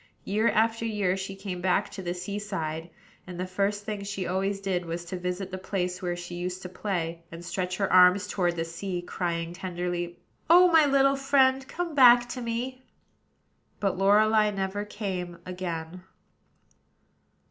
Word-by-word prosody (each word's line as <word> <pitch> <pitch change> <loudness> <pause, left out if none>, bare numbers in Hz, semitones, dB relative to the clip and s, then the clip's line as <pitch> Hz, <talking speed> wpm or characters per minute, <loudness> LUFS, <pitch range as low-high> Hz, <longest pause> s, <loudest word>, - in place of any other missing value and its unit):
Year 215 +4 +1
after 225 +1 +1
year 205 -5 0
she 195 0 -5
came 195 -2 -6
back 180 -1 +1
to 195 - -7
the 175 -1 -3
sea 200 +3 -4
side; 165 -5 -4 0.4
and 180 -1 -7
the 185 - -1
first 200 +2 -1
thing 210 -2 -4
she 195 -2 -4
always 195 +2 -1
did 190 -2 -1
was 170 0 -5
to 170 - -5
visit 180 +1 -3
the 185 - -5
place 180 -1 -3
where 175 -1 -2
she 175 0 -8
used 180 +1 -4
to 180 - -6
play, 175 -3 -3
and 170 +1 -9
stretch 185 0 -3
her 195 -2 0
arms 185 +2 +6
toward 175 -3 0
the 165 -1 -2
sea, 175 +2 -4
crying 170 -1 -3
tenderly: 175 -1 -4 0.3
"O 360 +2 +8
my 320 -3 +6
little 275 0 +4
friend! 270 -1 +3
come 345 +2 -4
back 245 -3 +7
to 250 - -5
me!" 245 +2 -3 1.0
But 195 -3 0
Lorelei 210 +2 +4
never 200 0 -3
came 185 -5 -4
again. 180 -1 -5
190 Hz, 170 wpm, -27 LUFS, 180-210 Hz, 1.0 s, O